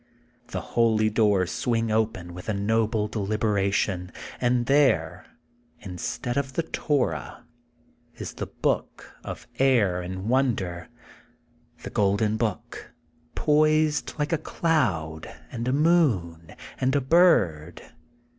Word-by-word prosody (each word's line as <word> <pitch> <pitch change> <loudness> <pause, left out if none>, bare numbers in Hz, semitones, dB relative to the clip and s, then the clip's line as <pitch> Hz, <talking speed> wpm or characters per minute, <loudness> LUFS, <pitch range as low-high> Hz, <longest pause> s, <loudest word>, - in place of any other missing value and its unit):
The - - -4
holy 110 -2 +3
doors 105 -4 +2
swing 115 -2 -1
open 110 -6 -1
with 90 +4 -8
a 105 - 0
noble 110 +1 0
deliberation, 100 -3 -1 0.3
and 120 -1 +2
there, 140 +1 +2 0.5
instead 115 +7 -4
of 135 -2 -2
the 165 - -1
Torah, 130 - -2 0.7
is - - -7
The - - -5
Book - - -3
of - - -7
Air 115 -10 +3
and 95 +2 -6
Wonder, 110 -9 0 0.5
— 120 0 -30
The - - -6
Golden 105 0 +1
Book, 110 -3 -4 0.4
poised 155 0 +2
like 150 +1 -1
a 165 - +1
cloud 100 - -1 0.2
and 120 0 -4
a - - +2
moon 130 - +1 0.2
and 130 +2 +1
a - - +4
bird. 100 - +3
110 Hz, 115 wpm, -25 LUFS, 95-130 Hz, 0.7 s, a